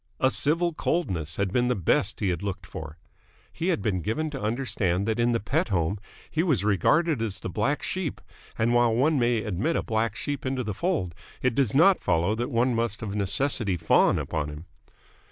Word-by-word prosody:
A 130 - +3
civil 170 +4 +1
coldness 90 - -2
had 100 -1 -1
been 125 0 +2
the 125 - +1
best 95 +3 0
he 100 - +1
had 85 -1 -2
looked 95 -3 -4
for. 80 -1 -8 0.6
He 170 - -3
had 175 - 0
been 95 -4 0
given 150 - -2
to 135 - -6
understand 105 -5 -1
that 110 +1 0
in 120 +1 +3
the 115 - +1
Pett 105 - -1
home 95 +1 0 0.3
he 160 - +1
was 150 - +1
regarded 130 - +2
as 110 -4 -3
the - - -5
black 135 - 0
sheep: 185 -6 -2 0.4
and, 115 +2 +2
while 120 -2 +3
one 145 +4 +2
may 120 -2 +1
admit 105 - -1
a - - 0
black 110 -1 -1
sheep 145 -1 -4
into 130 -1 -2
the 105 -2 -3
fold, 120 - -1 0.3
it 130 - +2
does 130 -2 +1
not 185 +6 +6
follow 85 +2 +1
that 120 +3 -2
one 120 +2 +1
must 115 -1 -1
of 100 -3 -4
necessity 100 0 +1
fawn 80 -1 +3
upon 75 -2 -2
him. 75 +3 -9
115 Hz, 205 wpm, -26 LUFS, 95-135 Hz, 0.6 s, not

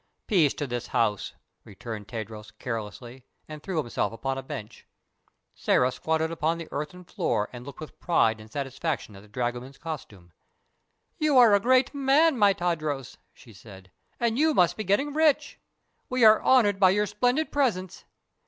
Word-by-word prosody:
"Peace 170 - +3
to 145 - -3
this 120 -2 -4
house," 105 -4 0 0.3
returned 105 +1 -8
Tadros, 110 -2 -7
carelessly, 120 +2 -6 0.2
and 155 -1 -9
threw 185 0 -4
himself 120 -7 -1
upon 135 +4 -3
a 135 - -4
bench. 120 -5 -9 0.7
Sĕra 125 0 +2
squatted 160 0 -1
upon 165 0 -1
the 165 -1 -7
earthen 150 +5 -5
floor 165 - -2
and 120 -1 -8
looked 140 - -10
with 155 - -10
pride 110 -10 +2
and 110 0 -15
satisfaction 140 -3 -4
at 95 - -12
the 105 - -17
dragoman's 120 +4 -4
costume. 105 - -8 0.9
"You 305 -3 +3
are 235 -4 +7
a 200 - +5
great 255 +5 +3
man, 285 +3 +3
my 205 -4 +5
Tadros," 155 -7 -3
she 115 - -17
said, 95 -2 -14 0.3
"and 235 +1 0
you 310 -1 +3
must 175 -2 +3
be 215 - -4
getting 270 +10 +1
rich. 310 -2 +2 0.5
We 255 -2 +3
are 215 0 +7
honored 210 -7 +4
by 190 -2 +6
your 205 +3 +2
splendid 250 +9 0
presence. 205 -11 -1
155 Hz, 165 wpm, -26 LUFS, -, 0.9 s, are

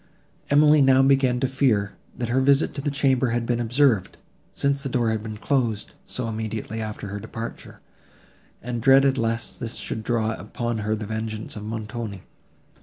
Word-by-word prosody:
Emily 150 +1 +6
now 135 -1 +5
began 135 -2 +3
to 130 - +2
fear, 120 -7 +1 0.3
that 120 -2 -3
her 130 +2 +2
visit 140 +2 +3
to 140 - -5
the 145 - -1
chamber 135 -2 +2
had 120 0 -1
been 120 0 0
observed, 120 -4 +2 0.3
since 140 0 0
the 135 - -3
door 120 -3 +1
had 110 -1 -1
been 110 -1 -6
closed, 115 -4 -1 0.2
so 125 -2 -3
immediately 110 0 -4
after 105 -2 -5
her 105 +1 -5
departure; 115 +2 -8 0.8
and 120 0 -3
dreaded 135 +1 +5
lest 115 0 -2
this 115 - -4
should 110 - -4
draw 115 -1 0
upon 115 +2 -4
her 110 +1 0
the 110 0 -5
vengeance 110 0 -4
of 105 - -7
Montoni. 110 -2 -5
115 Hz, 175 wpm, -24 LUFS, 110-135 Hz, 0.8 s, Emily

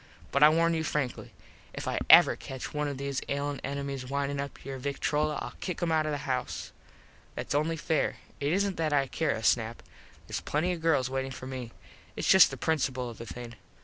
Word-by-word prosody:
But 140 - +1
I 150 - +10
warn 165 +1 +3
you 160 -1 0
frankly. 150 -5 -2 0.5
If - - -5
I - - 0
ever - - +9
catch 130 -1 -7
one 150 0 -1
of 140 -2 -4
those 140 0 -2
ailin 140 0 -2
enemies 140 -1 -3
windin 140 +2 -2
up 140 -2 -8
your 135 -1 -5
victrola 150 +2 0
Ill - - -6
kick 180 -3 -4
him 175 -2 0
out 155 -1 +2
of - - -1
the 145 -1 -4
house. 130 -2 -3 0.6
Thats - - -3
only 155 +3 +1
fair. 160 -1 0 0.2
It 145 +1 0
isn't 195 +1 +1
that 155 -2 0
I 140 -1 +3
care 150 +2 -1
a 110 - -6
snap. 115 +1 +1 0.4
Theres - - -3
plenty 160 +5 0
of 170 - -6
girls 145 -6 +2
waitin 135 0 -2
for 130 -1 -8
me. 130 -3 -6 0.4
Its - - -2
just 190 -1 +8
the - - -7
principul 130 -6 0
of 115 - -13
the 115 - -7
thing. 120 -1 -7
140 Hz, 210 wpm, -29 LUFS, 130-155 Hz, 0.6 s, I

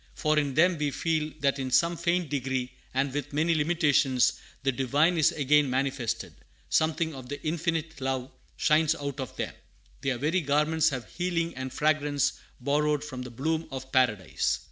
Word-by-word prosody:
For 155 0 +2
in 140 -3 -2
them 170 +1 +4
we 150 -1 +1
feel 155 +1 -1
that 140 -1 +1
in 130 -1 -2
some 170 +6 +3
faint 170 -1 0
degree, 130 -2 -2 0.2
and 135 +1 0
with 145 0 -4
many 160 +3 +2
limitations, 150 -5 +3 0.3
the 135 - +2
Divine 140 +7 +2
is 160 -3 +4
again 150 -1 +3
manifested: 130 -2 -1 0.4
something 160 0 +1
of 130 -2 -9
the 145 - -4
Infinite 160 -1 -2
Love 130 -1 -2 0.3
shines 155 +1 +3
out 140 -2 -5
of 130 -3 -5
them; - - -3 0.5
their 135 -3 0
very 155 +8 +1
garments 150 +2 +2
have 130 -3 -5
healing 175 -1 -2
and 130 0 -5
fragrance 150 -1 +1 0.3
borrowed 150 +2 +1
from 130 -4 -6
the 125 - -6
bloom 160 +7 -2
of 130 -1 -7
Paradise. 105 -8 +1
145 Hz, 165 wpm, -28 LUFS, 135-160 Hz, 0.5 s, them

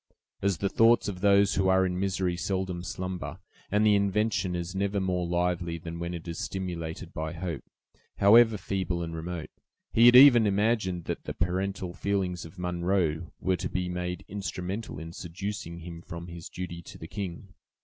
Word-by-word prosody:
As 100 -3 +1
the 100 - 0
thoughts 115 +4 +4
of 95 -3 -5
those 100 0 +5
who 95 -1 +2
are 95 0 +4
in 90 0 -2
misery 95 -2 0
seldom 95 -1 -2
slumber, 90 0 -5 0.3
and 105 +2 +3
the 105 - +6
invention 100 -2 +1
is 85 +1 -4
never 100 +1 0
more 90 -2 0
lively 85 -1 0
than 85 +1 -7
when 85 +1 -3
it 85 0 -8
is 85 -1 -5
stimulated 85 -3 -4
by 80 0 -3
hope, 85 -3 -4 0.5
however 110 +2 +6
feeble 90 -2 -2
and 80 0 -5
remote, 85 0 -5 0.4
he 115 +1 +7
had 120 - +8
even 125 -4 +9
imagined 100 -3 +1
that - - -4
the - - -5
parental 95 +2 -1
feelings 95 -4 -1
of 80 +4 -13
Munro 90 -2 0
were 95 -1 +1
to - - -3
be 90 -1 -2
made 90 0 -4
instrumental 95 0 -4
in 80 +2 -7
seducing 85 0 -5
him 85 0 -8
from 85 0 -8
his 85 -1 -8
duty 85 -2 -6
to - - -12
the - - -9
king. 95 0 -6
90 Hz, 180 wpm, -28 LUFS, 85-100 Hz, 0.5 s, even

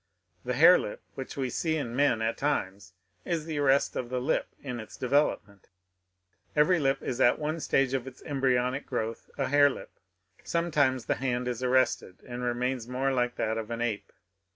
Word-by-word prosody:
The - - -2
hare - - +8
lip - - -6
which - - -7
we 130 -2 -1
see 160 -2 0
in 120 -5 -4
men 130 -5 +2
at 115 +1 0
times, 100 -10 -2 0.3
is 165 -3 -2
the 155 -3 -3
arrest 140 -1 +3
of 120 - -3
the 125 0 -1
lip 130 +6 0 0.2
in 125 -4 -4
its 110 -1 -10
development; 125 -7 0 0.9
every 165 +4 +4
lip 135 -2 0
is 130 +1 -2
at 120 - +5
one 155 +2 -2
stage 135 -3 +1
of 135 -1 -2
its 130 -1 -11
embryonic 130 -2 0
growth 115 -3 -4
a 135 -2 -1
hare 145 +1 +6
lip. - - -8 0.5
Sometimes 145 -7 +1
the - - 0
hand 125 -2 -1
is 125 -1 -3
arrested, 130 -7 +1
and 120 0 -5
remains 125 0 -1
more 130 +2 0
like 125 -1 0
that 110 0 -1
of 110 0 -6
an 115 0 -4
ape. 115 -4 -2
130 Hz, 185 wpm, -28 LUFS, 120-145 Hz, 0.9 s, hare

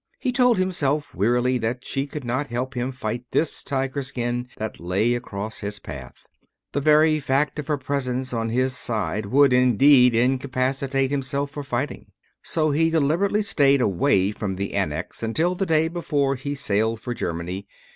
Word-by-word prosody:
He 255 - -1
told 250 -2 +3
himself 155 -6 0
wearily 125 +5 +1
that 120 +2 -3
she 135 +1 -2
could 145 0 -7
not 130 +4 -2
help 130 +2 -3
him 125 +1 -2
fight 120 -2 -4
this 160 - 0
tiger 135 0 -2
skin 125 -2 -3
that 110 0 -5
lay 95 +7 +1
across 110 -3 -5
his 105 0 -4
path, 65 -8 -10 0.5
The 145 - -1
very 155 +1 +4
fact 140 +2 0
of 145 - -5
her 150 -2 0
presence 130 -2 -2
by 115 -1 -1
his 130 +3 0
side 110 -4 -1
would, 140 +4 +4
indeed, 125 0 +5
incapacitate 130 +2 0
himself 140 0 -2
for 145 - -5
fighting. 130 +1 -4 0.3
So 155 -2 0
he 165 +3 +2
deliberately 165 +7 +1
stayed 140 -8 +3
away 100 -2 +2
from 105 -2 -4
the 100 +1 -4
Annex - - -2
until 155 +11 +1
the 190 +1 -2
day 160 0 +3
before 150 -5 0
he 140 +3 -4
sailed 110 -4 0
for 120 +2 -4
Germany. 90 -2 -4
130 Hz, 165 wpm, -23 LUFS, 115-145 Hz, 0.5 s, indeed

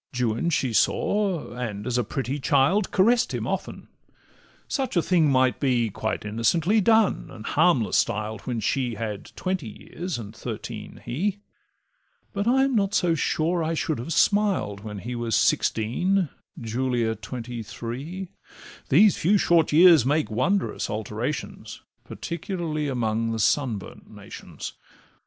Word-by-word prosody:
Juan 120 +6 0
she 130 -7 0
saw, 195 - +1
and, 110 -4 -5
as 125 - -2
a 125 - +2
pretty 135 +4 -3
child, 150 +9 +2
Caress'd 230 +5 +3
him - - -3
often—such 265 -8 -6
a - - +5
thing 165 -5 +3
might 130 -1 +2
be 120 -5 +1
Quite 110 +2 -3
innocently 160 - +2
done, 220 - +3
and - - -10
harmless - - +2
styled, 105 0 -1
When 120 -3 -3
she 125 +2 -1
had 105 -2 -5
twenty 185 -10 -3
years, 175 - -6
and 110 -2 -8
thirteen - - -7
he; 195 +10 -2 0.9
But 200 +2 -2
I 265 +2 +4
am 270 0 +1
not 200 -2 +1
so 175 -3 +3
sure 165 +2 0
I 165 +1 -1
should 155 -3 -1
have 125 +8 -5
smiled 195 - +2
When 105 0 -7
he 120 +5 -6
was 120 -2 -1
sixteen, 175 - +1 0.3
Julia 120 0 -1
twenty 115 +2 -6
three; 130 - -6 0.6
These 195 +8 +5
few 200 +6 +3
short 170 -4 +3
years 165 -2 +7
make 145 +1 0
wondrous 190 - 0
alterations, 110 +6 -4 0.2
Particularly 170 -4 -4
amongst 115 -3 0
sun 130 -7 0
burnt 95 - -12
nations. - - -9
135 Hz, 140 wpm, -25 LUFS, 115-180 Hz, 0.9 s, years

